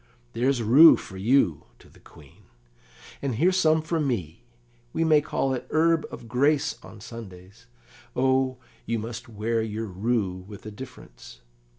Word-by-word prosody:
"There's 125 +1 0
rue 140 +9 +8
for 95 - -10
you," 100 - +2
to - - -19
the - - -21
Queen, 70 -3 -19 0.8
"and 135 -4 -2
here's 180 +9 +2
some 160 -3 +3
for 160 +1 -1
me; 95 - -3 0.5
we - - 0
may 155 -2 +4
call 135 -2 -1
it 125 - -5
herb 165 0 +2
of 115 - -10
grace 140 +5 +1
on 110 - -13
Sundays. 100 -2 -12 0.5
O, 130 0 +1 0.3
you 115 - 0
must 115 +2 -7
wear 115 +1 -1
your 110 0 -4
rue 95 -2 -2
with 100 -1 -11
a 110 - -6
difference. 105 - -12
115 Hz, 155 wpm, -25 LUFS, 105-140 Hz, 0.8 s, rue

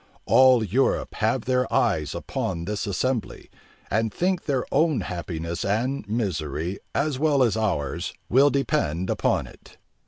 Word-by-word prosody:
All 130 -3 +6
Europe 120 +7 0
have 110 +2 0
their 125 0 +1
eyes 75 -2 +1
upon 85 -2 -3
this 105 +2 -3
assembly, 120 +4 -2 0.4
and 110 +1 +1
think 180 - -1
their 135 -4 0
own 155 -1 +2
happiness 85 -1 -4
and 115 +3 -1
misery, 90 - -2 0.2
as 140 -2 0
well 145 -3 +3
as 115 -4 +2
ours, 100 -11 -1 0.2
will 135 +4 +5
depend 135 - 0
upon - - +1
it. - - -16
110 Hz, 135 wpm, -25 LUFS, 90-135 Hz, 0.4 s, All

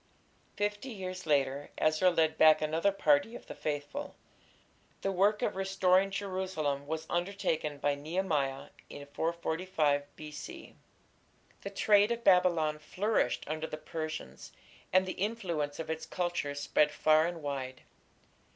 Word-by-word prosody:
Fifty 205 +5 -2
years 185 -5 -6
later 140 -1 +1
Ezra 155 +4 +3
led 160 -2 +2
back 155 0 +7
another 160 +6 +1
party 155 +3 +2
of - - -10
the - - -8
faithful. 150 - -4 0.9
The 195 - 0
work 200 +3 +2
of - - 0
restoring 190 0 +3
Jerusalem 185 -8 -2
was 160 +1 -3
undertaken 175 -5 -1
by 145 0 +1
Nehemiah 145 -3 -2 0.2
in 145 - -9
445 160 -1 0
B.C. 150 -1 -9 0.9
The 200 - -5
trade 205 +2 +4
of 235 0 -2
Babylon 170 -5 +4
flourished 200 +8 0
under 155 +1 -3
the 155 - -6
Persians, 155 0 -6 0.4
and 185 0 +4
the 185 - -3
influence 175 -9 -2
of 160 -1 -4
its 160 0 -4
culture 175 -5 -2
spread 150 +1 +2
far 155 +2 +4
and 170 -3 -6
wide. 135 -2 -4
160 Hz, 135 wpm, -31 LUFS, 150-190 Hz, 0.9 s, back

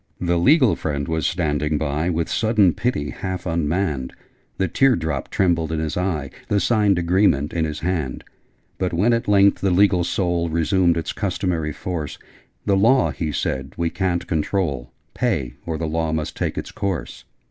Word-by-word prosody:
The 85 -1 +1
legal 130 - +5
friend 70 -2 -3
was 80 -2 0
standing 75 -4 0
by, 75 +3 -1
With 85 -1 -1
sudden 110 -6 +3
pity 75 -11 -1
half 95 -2 -5
unmanned: 80 -4 -1 0.4
The 95 - +1
tear 135 +8 +3
drop 80 - -3
trembled 85 -4 +1
in 80 - -1
his 80 0 -2
eye, 85 -7 -2 0.2
The 105 - +2
signed 105 -1 +2
agreement 85 -5 +2
in 80 -2 0
his 75 -1 -5
hand: 80 -7 -2 0.6
But 90 -2 -1
when 105 +8 +3
at 115 - -1
length 100 -1 +4
the 100 - +2
legal 90 -1 +4
soul 85 -1 0
Resumed 85 +1 +2
its 80 - -3
customary 90 -5 -1
force, 80 -1 -5 0.5
'The 100 - +3
Law,' 125 +7 +4
he 80 -3 -3
said, 65 -1 -3
'we 85 -1 0
ca'n't 90 -3 -1
control: 75 -7 -1 0.2
Pay, 80 - -1
or 80 -1 -2
the 80 - -3
Law 80 0 -1
must 80 -1 -3
take - - -2
its - - -5
course!' 95 -4 -4
85 Hz, 170 wpm, -22 LUFS, 80-95 Hz, 0.6 s, legal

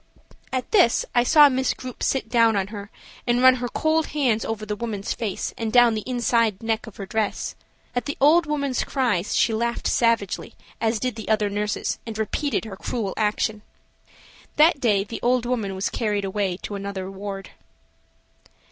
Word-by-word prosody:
At 255 -1 -3
this 370 - +4
I 240 - +4
saw 295 +3 +7
Miss 260 -1 0
Grupe 255 -1 -9
sit 265 -4 0
down 230 -1 +3
on 195 0 -1
her 205 -1 -8 0.4
and 240 +1 +2
run 260 0 +7
her 245 0 -3
cold 315 +3 +1
hands 255 -7 +1
over 220 -1 -4
the 210 - -3
old 210 - -9
woman's 210 -4 -3
face 215 -5 -3
and 225 -1 -2
down 240 -2 +5
inside 230 -2 +1
the 225 - -12
neck 225 +1 -1
of 225 - -11
her 195 - -5
dress. 215 +1 -2 0.4
At 245 - -1
the 285 - -4
old 320 +4 +5
woman's 280 -4 -1
cries 230 -9 0
she 225 - +3
laughed 235 +2 -2
savagely, 230 -5 +1 0.3
as 225 0 +1
did 255 0 -2
the 220 - -7
other 210 -2 +2
nurses, 210 0 -2
and 220 -1 -5
repeated 225 +3 -1
her 200 -3 -8
cruel 210 -3 -3
action. 215 0 0 0.9
That 310 0 +5
day 210 -6 +2
the 215 +3 -7
old 245 0 +2
woman 225 -6 -2
was 190 - -2
carried 210 -3 -1
away 195 -2 -1
to - - -5
another 200 -1 -5
ward. 195 0 -7
225 Hz, 185 wpm, -24 LUFS, 205-250 Hz, 0.9 s, saw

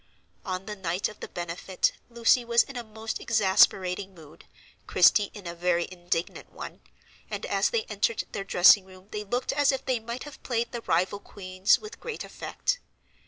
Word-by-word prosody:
On 185 -2 -4
the 210 - -5
night 185 -1 -1
of 215 - -13
the - - -6
benefit, 175 +2 -1 0.2
Lucy 235 +1 +3
was 235 0 +4
in 275 - -11
a 240 - -4
most 220 0 -5
exasperating 195 -3 +3
mood, 155 -3 -15 0.4
Christie 205 -2 +5
in 205 -3 -10
a 170 - -4
very 175 0 +1
indignant 175 -2 -3
one, - - -9 0.5
and - - -4
as - - +2
they 465 -2 0
entered 470 0 -1
their 195 - -4
dressing 190 0 +6
room 185 +1 -16
they 210 0 -4
looked 245 +5 -1
as 285 -1 +4
if 270 - -4
they 255 -3 +1
might 235 +3 -6
have 295 -1 -11
played 235 -2 -1
the 235 - -5
Rival 185 +2 +1
Queens 185 -2 +1
with 430 +1 -11
great 470 -3 -5
effect. - - -3
205 Hz, 180 wpm, -27 LUFS, 185-235 Hz, 0.5 s, dressing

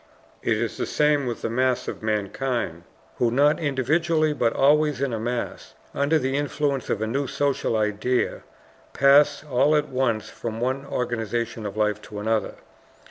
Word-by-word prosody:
It - - +1
is - - -2
the - - -2
same 150 -2 +2
with 120 - -4
the - - -1
mass 130 +1 +1
of - - -5
mankind, 105 -4 -2 0.3
who 120 - +2
not 145 +5 +3
individually, 155 +3 +1
but 120 -5 +1
always 150 +2 +3
in 135 -3 -1
a 110 - -2
mass, 120 +2 -4 0.2
under 140 +3 +2
the 135 -2 -1
influence 145 -2 -1
of 110 - 0
a - - +1
new 135 +5 -1
social 140 -5 0
idea 105 +4 0 0.5
pass 140 +1 +5
all 145 +1 +2
at 150 -1 +1
once 125 -4 0
from 115 -1 -6
one 130 +3 -2
organization 115 -3 -2
of 100 +1 -8
life 105 -1 +1
to 105 0 -10
another. 110 +1 -1
130 Hz, 165 wpm, -24 LUFS, 115-145 Hz, 0.5 s, pass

